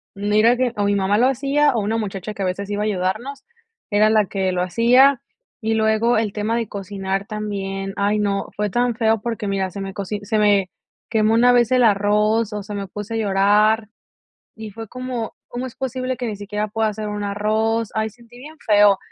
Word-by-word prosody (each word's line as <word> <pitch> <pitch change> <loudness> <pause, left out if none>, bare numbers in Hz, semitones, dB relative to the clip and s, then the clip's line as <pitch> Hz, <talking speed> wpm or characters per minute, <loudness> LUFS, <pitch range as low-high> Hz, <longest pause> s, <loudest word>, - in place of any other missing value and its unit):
no 205 +1 -2
era 230 +3 +5
que 255 -2 0
o 205 - +1
mi 205 0 +2
mamá 200 +1 +1
lo 250 +3 +4
hacía, 275 +3 +2
o 230 - 0
una 220 +3 -1
muchacha 205 -1 -4
que 200 - -7
a - - 0
veces 195 +2 -3
iba 205 0 -1
a - - -1
ayudarnos, 215 +8 -2 0.5
era 210 +1 +4
la 215 -1 +3
que 190 -1 -1
lo 180 -1 -1
hacía, 240 +9 +4 0.4
y 220 0 0
luego 220 +1 +2
el 215 -2 0
tema 215 +2 -1
de 230 -2 -1
cocinar 195 0 -4
también, 195 -2 -4
ay 205 +1 +1
no, 200 -1 -1
fue 210 0 -1
tan 240 +2 0
feo 225 -2 +1
porque 225 -2 -3
mira, 195 -1 -1
se 200 - -6
me 195 0 -5
coci 200 +2 -4
se 215 +2 -1
me 200 -3 +3 0.4
quemó 220 -1 +2
una 240 +2 +5
vez 240 -1 +3
el 255 -1 +4
arroz, 210 +1 +2
o 210 -1 -4
sea, 205 - -7
me 200 -1 -4
puse 210 +4 -7
a - - 0
llorar 210 +2 +3 0.7
y 220 -1 -8
fue 225 0 -8
como: 255 -3 -5
"¿Cómo 245 +2 -5
es 255 - -9
posible 255 -1 -3
que 245 - -4
ni 215 -3 -4
siquiera 210 +1 -3
pueda 220 +1 0
hacer 215 0 -4
un 210 0 -4
arroz?". 215 +2 0
Ay, 220 0 -1
sentí 235 +2 -19
bien 305 +5 -11
feo. 205 -2 +5
215 Hz, 215 wpm, -21 LUFS, 200-230 Hz, 0.7 s, era